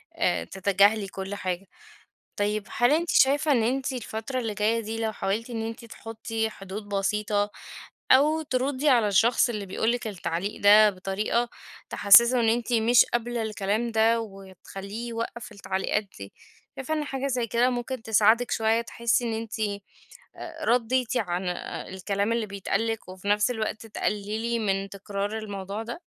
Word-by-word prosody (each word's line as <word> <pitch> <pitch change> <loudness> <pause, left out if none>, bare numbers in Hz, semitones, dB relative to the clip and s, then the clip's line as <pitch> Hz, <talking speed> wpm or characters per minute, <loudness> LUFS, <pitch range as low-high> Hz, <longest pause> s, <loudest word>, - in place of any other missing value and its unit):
آآ - - +1
تتجاهلي 200 +2 +2
كل 195 +1 -6
حاجة. 185 -1 -4 0.7
طيب 210 0 -1
هل 240 +3 +4
أنتِ 330 +3 +1
شايفة 290 +3 +4
إن 240 -4 +3
أنتِ 265 +4 -1
الفترة 245 +1 -4
اللي 225 -3 -3
جاية 215 +3 +1
دي 225 0 -5
لو 220 -1 -1
حاولتِ 215 +4 -2
إن 225 -1 -3
أنتِ 230 +1 -7
تحُطي 225 0 -4
حدود 200 +1 -8
بسيطة 205 +1 0 0.6
أو 300 +4 +4
ترُدي 275 0 0
على 235 -6 +4
الشخص 230 +6 +3
اللي 210 -4 -4
بيقول 220 +4 0
لِك 245 -1 -3
التعليق 190 0 -4
ده 210 +1 +7
بطريقة 200 +5 -1 0.4
تحسسّه 235 +5 +6
إن 230 - +2
أنتِ 240 +1 -1
مش 230 +1 +5
قابلة 240 0 -2
الكلام 220 +1 -1
ده 225 +1 +3
وتخلّيه 195 +2 -8
يوقف 230 0 -5
التعليقات 200 +1 -2
دي، 100 0 -9 0.4
شايفة 270 +4 -3
إن 305 -1 -1
حاجة 270 -1 -3
زي 250 -3 -1
كده 240 +3 +2
ممكن 245 0 -4
تساعدِك 225 +2 +3
شوية 225 +1 +2
تحسي 235 +1 0
إن 230 - -2
أنتِ 225 0 -5 1.1
رديتِ 250 0 +1
عن 180 -3 -2 0.5
الكلام 200 +3 -1
اللي 230 -1 -1
بيتقال 200 +2 -2
لِك 225 -4 -4
وفي 185 +1 -9
نفس 210 +3 +3
الوقت 220 -1 -3
تقللي 215 +2 -2
من 195 -2 -1
تكرار 200 +2 -4
الموضوع 200 0 -5
ده؟ 235 +9 -7
220 Hz, 155 wpm, -26 LUFS, 200-240 Hz, 1.1 s, ده